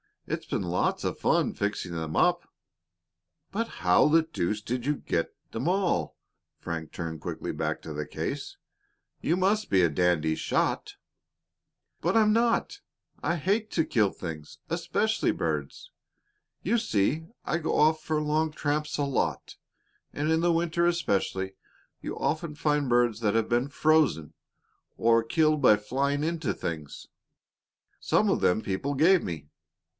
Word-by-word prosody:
It's - - -4
been - - -1
lots 90 0 0
of - - -2
fun - - +2
fixing 100 -3 -2
them 80 -2 -4
up." - - +2 1.0
"But 225 +3 -1
how 90 - +3
the 160 +2 +4
deuce 105 - -2
did 120 +3 -3
you 150 +1 +1
get 85 - -2 0.2
'em 120 +7 -2
all?" 185 0 0 0.4
Frank 80 -2 -5
turned 80 -2 -5
quickly - - -4
back - - -2
to 80 - -7
the 75 0 -4
case - - -4 0.6
again. - - -5
"You 170 - +3
must 205 +3 +1
be 95 - +4
a 85 - +4
dandy 80 -1 +1
shot." - - -1 1.0
"But - - 0
I'm 215 -1 +5
not! 230 +1 +1 0.4
I 170 - 0
hate 200 +7 0
to 160 - +2
kill 105 -5 +2
things 80 -5 -8
especially - - 0
birds. 75 -4 -3 0.7
You 225 +7 +2
see, 155 - 0 0.2
I - - 0
go 160 -2 -1
off 155 +1 +4
for 155 0 -1
long 155 +1 +1
tramps 150 0 -2
a 145 - 0
lot, 140 -2 -2 0.6
and 150 +2 -1
in 160 - +3
the 170 0 +3
winter 170 +1 +1
especially 95 - -1 0.5
you - - -5
often 155 0 -2
find 150 -3 0
birds 120 -2 +3
that 110 -2 +1
have 115 -1 +1
been 120 +3 +2
frozen, 150 - +2 0.6
or 115 0 +4
killed 155 +5 +2
by 115 -5 +7
flying 140 +7 -1
into 160 -5 -1
things. 75 -3 -6 0.9
Some - - +2
of - - +2
them 90 - +3
people 105 +10 -2
gave 170 +6 +5
me. 75 -4 -6
140 Hz, 150 wpm, -28 LUFS, -, 1.0 s, by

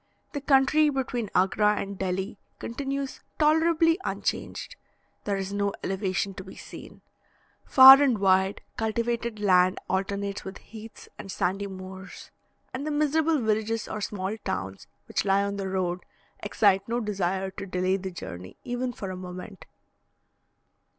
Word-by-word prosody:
The 285 - -3
country 285 +2 +4
between 250 -5 -2
Agra 210 +3 +3
and 200 -1 -4
Delhi 190 +2 -3 0.2
continues 275 +2 -4 0.2
tolerably 325 +2 +3
unchanged; - - -3 0.5
there 200 -1 0
is 195 0 -4
no 200 0 0
elevation 195 0 -1
to 190 - -8
be 190 - -12
seen. - - -11 0.6
Far 265 +1 +10
and 265 -6 +3
wide, 190 0 +2 0.2
cultivated 230 0 -2
land 185 -2 +4
alternates 200 +1 -2
with 190 0 -7
heaths 220 0 -12
and 195 -2 -7
sandy 195 +2 -1
moors, 190 0 -10 0.4
and 275 +4 -4
the - - 0
miserable 305 +2 +2
villages 220 0 0
or 215 - -5
small 200 0 -3
towns 95 - -5 0.2
which - - -1
lie 195 0 +3
on 200 0 -3
the 195 -1 -3
road, 180 -1 -1 0.4
excite 195 -2 +2
no 235 +1 0
desire 190 -3 -2
to 195 - -7
delay 185 +1 0
the 190 0 -5
journey 90 - -9
even 245 0 -3
for 195 -4 -6
a - - -5
moment. 185 +2 -9
200 Hz, 145 wpm, -27 LUFS, 190-240 Hz, 0.6 s, Far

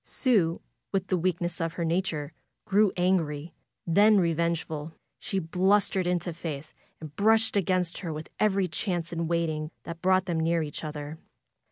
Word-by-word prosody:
Sue, 195 -11 +1 0.3
with 195 -2 0
the 185 - +2
weak 175 0 0
ness 175 0 -3
of 165 0 -1
her 170 - -2
nature, 165 -3 -1 0.3
grew 205 0 +4
angry, 170 -4 0 0.3
then 205 +5 +5
revengeful. 165 -3 0 0.3
She 195 - -3
blustered 190 +2 +2
into 175 -1 -1
Faith 155 -3 -6 0.3
and 155 -2 -9
brushed 220 +2 +3
against 185 -3 +1
her, 175 -4 -4
with 155 0 -7
every 195 -3 +2
chance 175 -1 -3
in 165 -1 -2
waiting 160 -2 -1
that 170 0 -7
brought 185 0 +3
them 170 -3 -1
near 165 0 +1
each 150 +1 -6
other. 150 0 -6
170 Hz, 160 wpm, -28 LUFS, 160-190 Hz, 0.3 s, then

